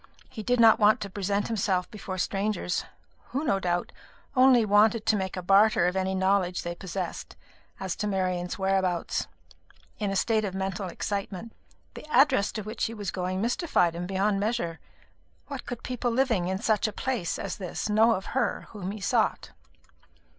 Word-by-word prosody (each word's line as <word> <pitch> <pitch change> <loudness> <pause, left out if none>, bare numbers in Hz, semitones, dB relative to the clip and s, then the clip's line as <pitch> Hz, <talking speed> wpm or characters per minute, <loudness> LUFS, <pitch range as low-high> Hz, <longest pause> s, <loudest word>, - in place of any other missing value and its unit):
He 230 - -8
did 245 +3 +1
not 225 -1 +7
want 210 0 +5
to 200 - -5
present 200 +1 -1
himself 190 -5 0
before 195 -3 -6
strangers 195 0 -1 0.4
who, 275 +4 -2
no 200 -10 +1
doubt, 175 -1 -1 0.4
only 255 -3 +6
wanted 215 +2 +4
to 220 - +3
make 190 -2 -3
a 185 - -4
barter 200 +2 +5
of 180 +1 0
any 190 0 0
knowledge 190 -1 +1
they 175 - -3
possessed 180 0 -5 0.4
as 190 -2 -3
to 210 - -2
Marian's 185 -3 -1
whereabouts 190 -3 0 0.7
in 205 -2 -1
a 195 - -2
state 220 +2 +2
of 195 -2 -3
mental 190 0 -3
excitement. 200 +3 -4 0.4
The 305 - -11
address 260 -7 +4
to 215 - -4
which 215 +3 -3
he 230 - -4
was 205 -4 -4
going 185 +1 -2
mystified 235 - +1
him 175 +1 -4
beyond 195 +1 +1
measure. 200 -6 -1 0.7
What 275 -3 -6
could 245 - -6
people 250 -1 -2
living 230 -7 +1
in 190 +1 -1
such 220 0 +1
a - - -3
place 245 -10 -2
as - - -4
this 185 0 -4
know 220 +2 +4
of 190 - -5
her 265 - 0
whom 195 -4 -5
he 205 +1 -6
sought? 180 - 0
200 Hz, 175 wpm, -27 LUFS, 185-225 Hz, 0.7 s, not